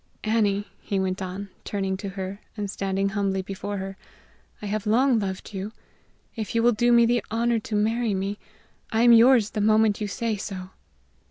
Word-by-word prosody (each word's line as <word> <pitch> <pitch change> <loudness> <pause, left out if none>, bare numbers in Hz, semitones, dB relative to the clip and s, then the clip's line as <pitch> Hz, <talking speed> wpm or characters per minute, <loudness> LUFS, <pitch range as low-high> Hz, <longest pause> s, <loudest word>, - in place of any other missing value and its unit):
Annie," 210 -2 +1 0.2
he 200 - -2
went 190 0 -1
on, 190 +1 -5
turning 195 -2 -2
to 200 0 -5
her, 195 +1 -6 0.2
and 205 -2 -3
standing 195 0 -1
humbly 195 -2 -1
before 200 +2 -5
her, 195 0 -6 0.6
"I - - -8
have 210 +1 -2
long 245 +2 +4
loved 190 0 -5
you; 200 +3 -5 0.6
if 220 -2 -4
you 230 - +3
will 240 - +6
do 240 +2 +2
me 235 0 +6
the 240 -1 +1
honor 230 +1 +1
to 215 0 -5
marry 220 +1 +1
me, 195 +2 -3 0.5
I 225 +1 +2
am 240 -1 +8
yours 230 -2 +6
the 210 - -2
moment 215 0 +3
you 210 - -1
say 225 +1 -2
so." 190 -2 -6
205 Hz, 185 wpm, -25 LUFS, 195-225 Hz, 0.6 s, am